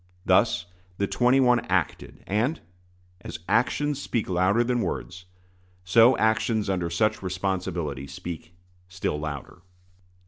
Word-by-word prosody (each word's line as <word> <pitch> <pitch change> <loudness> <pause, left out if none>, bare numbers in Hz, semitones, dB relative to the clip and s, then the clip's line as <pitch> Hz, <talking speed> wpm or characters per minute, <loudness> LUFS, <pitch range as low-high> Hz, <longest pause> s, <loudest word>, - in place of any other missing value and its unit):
Thus - - +3 0.3
the 100 - +1
twenty 125 +5 +3
one 125 -2 +4
acted; - - -2
and, 115 +11 0 0.6
as - - -7
actions 130 +7 +1
speak 115 -5 -2
louder 95 +5 +2
than 120 0 0
words, 90 -3 -4 0.6
so 115 +7 +5
actions 110 -1 +1
under 90 -3 -1
such 105 +5 +1
responsibility 90 -6 -3
speak 85 +3 -8 0.3
still 90 -5 -3
louder. 75 +3 -6
95 Hz, 115 wpm, -26 LUFS, 90-120 Hz, 0.6 s, so